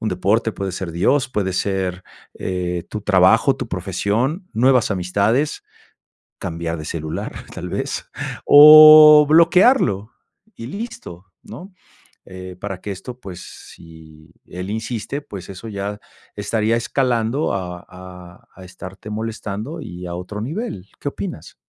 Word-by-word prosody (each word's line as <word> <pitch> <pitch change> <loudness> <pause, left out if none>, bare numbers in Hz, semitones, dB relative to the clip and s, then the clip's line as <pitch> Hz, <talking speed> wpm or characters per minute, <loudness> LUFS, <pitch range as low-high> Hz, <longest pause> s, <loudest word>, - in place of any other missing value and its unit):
un 110 - -2
deporte, 105 +5 0
puede 95 -2 -5
ser 95 -2 -5
Dios, 130 - +1
puede 95 -6 -2
ser, 95 -1 -2 0.4
eh, 90 -2 -3
tu 105 - -5
trabajo, 95 -3 +3
tu - - -5
profesión, 130 - -2
nuevas 125 +1 +2
amistades, 100 +10 0 0.8
cambiar 85 0 -5
de 75 - -7
celular, 80 -1 -5 0.2
tal - - -6
vez, - - -4 0.4
o 150 0 +9
bloquearlo 165 - +3 0.4
y 115 - -8
listo, 135 - -8 0.2
¿no? 190 +2 -11 0.5
Eh, 95 -1 -10
para 95 -2 -6
que 105 - -7
esto, 120 +6 -9
pues, 90 -4 -9 0.3
si 80 -1 -16
él 90 +2 -7
insiste, 110 +5 -4
pues 95 -7 -10
eso 95 +4 -9
ya 100 0 -5 0.4
estaría 110 +2 0
escalando 120 +2 -1
a 90 -2 -6
a 90 -1 -13
a 95 - -13
estarte 95 +3 -11
molestando 110 +6 -5
y 90 -4 -8
a 85 - -6
otro 90 +4 -7
nivel. 150 - -5
¿Qué - - -3
opinas? - - -7
100 Hz, 135 wpm, -20 LUFS, 90-125 Hz, 0.8 s, o